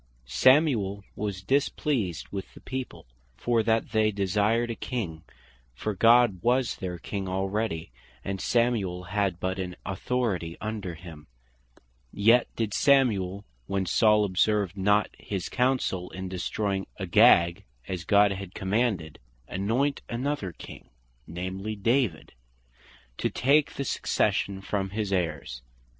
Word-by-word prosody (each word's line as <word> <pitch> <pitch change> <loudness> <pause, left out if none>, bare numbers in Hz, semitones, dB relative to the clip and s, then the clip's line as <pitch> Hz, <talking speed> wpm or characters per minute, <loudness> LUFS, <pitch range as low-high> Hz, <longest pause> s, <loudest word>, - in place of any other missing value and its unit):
Samuel 110 - +3
was 100 -3 -4
displeased 130 - 0
with 95 -2 -7
the - - -11
people, 130 -1 -6 0.3
for 120 - +1
that 110 0 0
they 110 -1 +3
desired 105 +4 +1
a - - -4
King, 95 -13 -4 0.5
(for 105 - -3
God 115 -1 +5
was 125 +2 +1
their 90 -3 -4
King 95 +2 -5
already, 95 - -2 0.3
and 95 -1 -3
Samuel 110 -7 +1
had 95 -1 -1
but 95 +1 -2
an 90 -1 -4
authority 95 -4 -2
under 105 -5 -4
him); 80 -3 -12 0.8
yet 115 +4 +4
did 110 -3 -2
Samuel, 105 -9 +2 0.2
when 95 -1 -1
Saul 105 +3 +4
observed 100 0 +1
not 105 +2 +2
his 95 -4 -4
counsell, 125 -8 0
in 95 0 -6
destroying 95 +1 -2
Agag 85 +3 +5 0.2
as 90 -3 -4
God 100 +1 +4
had 95 -1 -6
commanded, 95 -5 -1 0.3
anoint 115 +10 0
another 125 -5 -2
King, - - -12 0.4
namely 95 +5 -4
David, 115 - 0 0.9
to - - +1
take 140 +3 +2
the 140 - -3
succession 100 -5 0
from 95 0 -2
his 105 0 -2
heirs. 75 -9 -2
100 Hz, 125 wpm, -27 LUFS, 95-115 Hz, 0.9 s, God